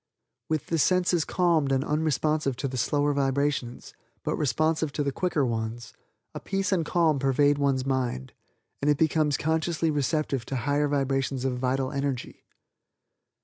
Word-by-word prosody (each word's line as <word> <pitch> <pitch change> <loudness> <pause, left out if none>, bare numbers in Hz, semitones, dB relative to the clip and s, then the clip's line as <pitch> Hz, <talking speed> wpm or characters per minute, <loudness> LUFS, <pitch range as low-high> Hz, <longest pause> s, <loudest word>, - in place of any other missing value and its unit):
"With 155 -2 -1
the 165 - -1
senses 180 0 +2
calmed 165 -6 +1
and 135 0 +2
unresponsive 150 -2 0
to 135 +2 -3
the 130 - -5
slower 145 +3 +1
vibrations, 140 -2 -1 0.3
but - - -1
responsive 155 +3 0
to 145 - -1
the 140 - -1
quicker 155 -2 0
ones, 115 0 -4 0.4
a - - -5
peace 195 0 -2
and 180 -4 +2
calm 160 -2 +2
pervade 145 +2 +2
one's 135 -2 +1
mind, 125 - -2 0.5
and 145 - +1
it 145 - +3
becomes 155 -2 +2
consciously 160 +1 0
receptive 145 -2 -1
to 135 - -3
higher 145 +4 +1
vibrations 135 -2 -1
of 125 -2 -1
vital 130 +1 0
energy. 140 -2 -4
145 Hz, 150 wpm, -27 LUFS, 135-155 Hz, 0.5 s, it